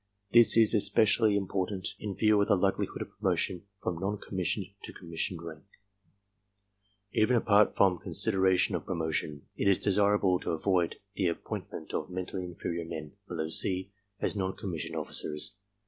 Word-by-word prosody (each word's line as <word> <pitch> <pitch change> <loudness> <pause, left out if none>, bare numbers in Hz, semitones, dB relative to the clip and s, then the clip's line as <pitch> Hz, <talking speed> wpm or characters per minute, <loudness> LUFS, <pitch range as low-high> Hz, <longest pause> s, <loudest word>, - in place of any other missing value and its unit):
This 115 -1 +7
is 115 -1 +6
especially 105 +1 +4
im 100 - -1
portant 95 0 -2
in 100 -2 -4
view 105 -1 +4
of 100 - +1
the - - +4
likelihood 95 +1 0
of - - -15
promotion 90 +1 -1 0.2
from 85 - -2
non 100 +3 -2
com 100 - -10
missioned 95 +2 -1 0.2
to - - -7
commissioned 85 0 -4
rank. 80 -1 -9 1.5
Even 110 +3 +3
apart 105 -2 +4
from 95 -3 +3
considera 95 -3 +2
tions - - +1
of - - -11
promotion, 80 -4 -2
it - - -1
is 100 -2 +5
desirable 100 -2 +2
to - - -3
avoid 90 +1 +1 0.2
the 95 -2 0
appointment 85 - -5
of - - -2
mentally 90 0 -4
inferior 85 -1 -4
men 80 -2 -7 0.2
(below 80 -4 -3
C) 95 +3 0 0.3
as - - -1
non 95 -1 -2
commissioned 80 -4 -5
officers. 80 +4 -2
95 Hz, 165 wpm, -30 LUFS, 85-100 Hz, 1.5 s, This